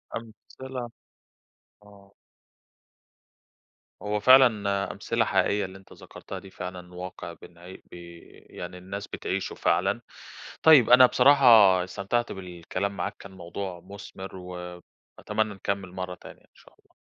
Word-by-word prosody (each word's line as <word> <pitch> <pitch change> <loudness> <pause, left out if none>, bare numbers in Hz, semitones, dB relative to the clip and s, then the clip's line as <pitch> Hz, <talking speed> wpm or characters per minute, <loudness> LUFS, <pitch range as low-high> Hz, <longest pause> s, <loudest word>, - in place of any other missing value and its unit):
أمثلة 120 +2 -8 0.9
آه. 100 -1 -19 1.9
هو 105 0 -2
فعلًا 105 -5 +4
أمثلة - - -1
حقيقية 100 -1 +1
اللي 95 +1 -10
أنت 95 - -17
ذكرتها - - -10
دي، 95 - -13
فعلًا 90 0 -8
واقع 90 -1 -7
بن 85 +2 -13
بي 85 -1 -12 0.3
يعني 90 +1 -8
الناس 100 +3 -7
بتعيشه 95 +1 -4
فعلًا. 95 +7 0 0.6
طيب، 150 -7 +7
أنا 125 +1 +9
بصراحة 140 +2 +4 0.4
استمتعت 100 +6 -2
بالكلام 90 +2 -5
معاك، 90 - -4
كان 100 - -12
الموضوع 95 0 -7
مثمر 95 -1 -10
و 90 0 -8 0.6
أتمنى 110 -1 -1
نكمل 100 -1 -4
مرة 90 0 -6
تانية، - - -14
إن - - -31
شاء - - -21
الله. - - -32
95 Hz, 125 wpm, -26 LUFS, 90-105 Hz, 1.9 s, أنا